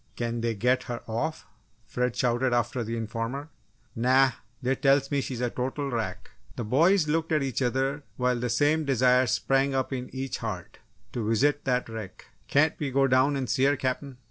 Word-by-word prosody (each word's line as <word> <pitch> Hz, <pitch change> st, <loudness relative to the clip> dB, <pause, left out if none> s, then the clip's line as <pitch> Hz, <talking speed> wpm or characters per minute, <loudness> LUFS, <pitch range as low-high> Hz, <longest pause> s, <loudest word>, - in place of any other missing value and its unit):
"Can 120 Hz, -1 st, -2 dB
they 115 Hz, -1 st, -1 dB
get 125 Hz, +5 st, +2 dB
her 120 Hz, -1 st, -4 dB
off?" 120 Hz, +8 st, -3 dB, 0.4 s
Fred 125 Hz, +2 st, -1 dB
shouted 125 Hz, 0 st, +1 dB
after 120 Hz, +1 st, 0 dB
the 115 Hz, +1 st, -3 dB
informer. 115 Hz, +6 st, -4 dB, 0.5 s
"Nah 130 Hz, +3 st, +4 dB, 0.3 s
they 130 Hz, 0 st, 0 dB
tells 135 Hz, 0 st, +2 dB
me 140 Hz, -1 st, +1 dB
she's 125 Hz, -2 st, -5 dB
a 120 Hz, -1 st, 0 dB
total 135 Hz, +2 st, -3 dB
wrack!" 110 Hz, -6 st, -4 dB, 0.2 s
The -, -, -3 dB
boys 160 Hz, -, +3 dB
looked 160 Hz, +2 st, 0 dB
at 155 Hz, -3 st, +2 dB
each 135 Hz, 0 st, -2 dB
other 135 Hz, +3 st, 0 dB, 0.2 s
while 125 Hz, -1 st, +1 dB
the 125 Hz, 0 st, -2 dB
same 145 Hz, +7 st, +2 dB
desire 130 Hz, -2 st, +3 dB
sprang 135 Hz, +4 st, +1 dB
up 130 Hz, 0 st, -1 dB
in 125 Hz, -1 st, -4 dB
each 135 Hz, 0 st, -4 dB
heart -, -, -6 dB, 0.3 s
to 110 Hz, -3 st, -2 dB
visit 145 Hz, +6 st, +2 dB
that 125 Hz, -2 st, +1 dB
wreck! 110 Hz, -4 st, -8 dB, 0.2 s
"Can't 150 Hz, +3 st, +3 dB
we 145 Hz, -, -1 dB
go 135 Hz, +1 st, +3 dB
down 130 Hz, +2 st, +3 dB
and 135 Hz, -2 st, -2 dB
see 130 Hz, +3 st, +2 dB
her, 145 Hz, +1 st, +4 dB
Captain?" 130 Hz, 0 st, -3 dB
130 Hz, 190 wpm, -27 LUFS, 120-140 Hz, 0.5 s, Nah